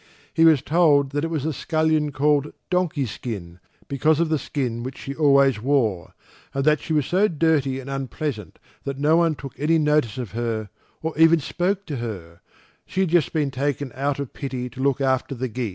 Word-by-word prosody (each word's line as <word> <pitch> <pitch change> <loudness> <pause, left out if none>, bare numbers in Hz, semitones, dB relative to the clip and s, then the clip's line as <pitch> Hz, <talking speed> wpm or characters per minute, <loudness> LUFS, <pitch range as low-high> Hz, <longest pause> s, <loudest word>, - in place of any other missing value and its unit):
He 165 +2 +4
was 155 -5 +5
told 145 -4 +3
that 145 +1 -1
it 165 - -1
was 155 -4 -2
a 160 - -1
scullion 155 +1 0
called 145 +1 +1 0.2
Donkey 175 -6 +1
skin 95 -5 -6 0.3
because 150 +3 +2
of 170 -1 +1
the 155 -2 +1
skin 125 -6 -3
which 130 +2 -6
she 140 - -6
always 140 -5 +4
wore, 115 - 0 0.4
and 135 0 0
that 150 -1 +4
she - - -8
was 150 -3 +2
so 190 +7 +3
dirty 150 -6 +1
and 135 - -9
unpleasant 135 - -4 0.3
that 140 -1 -4
no 150 +3 +3
one 165 -2 +3
took 135 -2 -9
any 160 +3 +3
notice 150 -6 +1
of 125 -6 -5
her, 115 -2 -3 0.3
or 160 0 -2
even 165 0 +6
spoke 185 +6 -1
to 145 -4 -4
her; 90 -8 -7 0.5
she 190 - -1
had 190 - +1
just 175 -3 +3
been 150 -3 0
taken 140 0 -2
out 140 +1 -1
of 140 -3 -5
pity 130 -3 -5
to 130 - -8
look 140 0 +1
after 130 0 0
the 130 +1 -2
geese. 120 -1 -3
140 Hz, 200 wpm, -23 LUFS, 130-155 Hz, 0.5 s, even